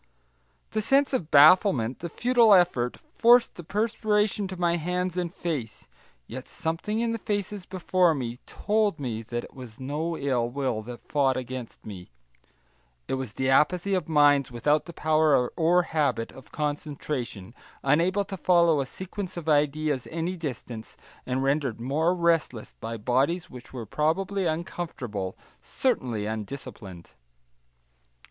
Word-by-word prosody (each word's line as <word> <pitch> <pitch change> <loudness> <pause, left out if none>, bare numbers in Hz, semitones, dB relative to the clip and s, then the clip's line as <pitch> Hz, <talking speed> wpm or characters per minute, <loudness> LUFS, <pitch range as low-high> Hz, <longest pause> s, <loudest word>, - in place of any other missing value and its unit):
The 215 - 0
sense 275 +5 +3
of 175 -12 -1
bafflement, 145 - +5
the 170 - -5
futile 235 +2 +5
effort, 150 -10 +2 0.2
forced 240 +1 +5
the 175 - -10
perspiration 210 +1 0
to 185 -1 -7
my 170 -1 +1
hands 180 +2 -2
and 175 -2 -2
face 150 - -4 0.4
yet 130 - -8
something 165 +7 -3
in 235 -1 0
the 230 - -3
faces 205 -2 -3
before 185 -2 +2
me 125 -3 -4
told 210 -5 0
me 120 -5 -3
that 120 +1 -4
it - - -12
was 125 -3 -11
no 155 +5 -3
ill 125 -4 0
will 130 -4 -2
that 120 +2 -10
fought 135 -3 +1
against 125 -1 -7
me; 95 -4 -9 1.0
it - - -3
was 130 -5 -3
the 130 - -1
apathy 175 +8 +3
of 185 -2 -1
minds 145 -4 +4
without 145 +6 +1
the 170 - -9
power 155 -5 +3
or 175 +2 +3
habit 150 -8 -1
of 130 - -15
concentration, 145 -8 -4 0.3
unable 175 +8 +2
to 195 0 -6
follow 170 -4 +4
a 135 - -4
sequence 190 +4 -6
of 165 -2 -6
ideas 150 -2 +1
any 165 +3 -2
distance, 125 -8 -6 0.3
and 130 +1 -1
rendered 135 -4 0
more 155 +8 +1
restless 165 -10 0
by 115 +1 -6
bodies 140 - 0
which 125 -1 -11
were 120 -3 -6
probably 180 - 0
uncomfortable, 145 - -4 0.2
certainly 115 -5 -1
undisciplined. 105 -4 -7
150 Hz, 145 wpm, -26 LUFS, 125-180 Hz, 1.0 s, bafflement